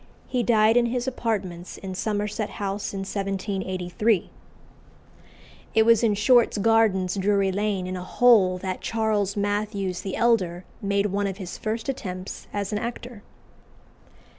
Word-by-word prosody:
He 250 - 0
died 225 -1 +4
in 240 -1 +4
his 245 +1 -2
apartments 200 -8 -3
in 190 -1 -6
Somerset 210 +2 -2
House 200 0 -4
in 195 - -4
1783. 195 0 -1 1.4
It 220 - +6
was 230 -1 +5
in 220 -3 +2
Short's 235 +2 +4
Gardens, 205 -4 +3
Drury 200 0 +2
Lane, 200 -1 -1
"in 185 0 -4
a 180 - -5
hole," 195 -3 +4
that 185 0 -4
Charles 215 -3 0
Mathews 205 -2 -1
the 195 - -4
elder 190 -7 +1 0.2
made 200 0 +1
one 200 0 0
of 195 -1 -4
his 185 -4 -7
first 220 +3 -3
attempts 185 -8 -5
as 200 0 -3
an 210 - 0
actor. 235 -1 -6
205 Hz, 140 wpm, -25 LUFS, 190-225 Hz, 1.4 s, It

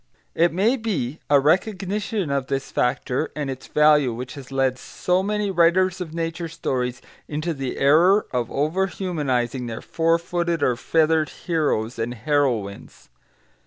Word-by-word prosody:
] - - -44
It 175 - +2
may 210 +10 +2
be 170 - -3
a 145 -1 +6
recognition 190 - 0
of 135 -2 -1
this 135 0 -3
factor 125 +3 0
and 145 -3 -3
its 130 0 -8
value 150 -4 +4
which 125 +2 -6
has 135 -2 -11
led 135 -1 0
so 180 +7 -1
many 210 0 -1
writers 185 +1 +3
of 170 -3 -5
nature 165 +1 -3
stories 125 -6 -3 0.2
into 155 +3 -2
the 135 -3 -4
error 170 +9 +4
of 120 -2 -1
over 160 +7 0
humanising 135 -10 -2
their 115 -1 -5
four 165 0 +1
footed 170 -2 -2
or 125 - +2
feathered 155 +3 +2
heroes 145 -10 -1
and 120 +2 -2
heroines. 120 -6 -2
155 Hz, 155 wpm, -23 LUFS, 130-175 Hz, 0.2 s, a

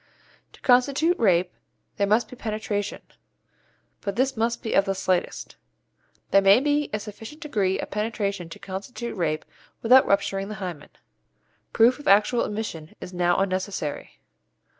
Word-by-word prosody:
To - - -18
constitute 280 +7 +3
rape 180 -5 +3 0.4
there 200 - +1
must 215 +4 +2
be - - -11
penetration, 215 -3 -3 1.0
but 200 -1 -4
this 265 +3 +1
may 225 +1 +1
be 220 - -4
of 195 - +4
the 195 -1 -1
slightest. 185 -2 -2 0.7
There 195 - +6
may 195 +3 +6
be 290 +1 +1
a 210 - -2
sufficient 220 +7 -10
degree 200 - 0
of - - -5
penetration 200 -4 -2
to - - -9
constitute 220 +5 -6
rape 155 -5 -1 0.4
without 255 +3 +6
rupturing 195 0 0
the 215 - -6
hymen. 180 -7 -7 0.8
Proof 240 +5 +4
of 290 - -9
actual 210 +4 +4
emission 205 -7 -5
is 180 - -9
now 175 0 +2
unnecessary. 185 -5 -3
205 Hz, 145 wpm, -25 LUFS, 190-235 Hz, 1.0 s, There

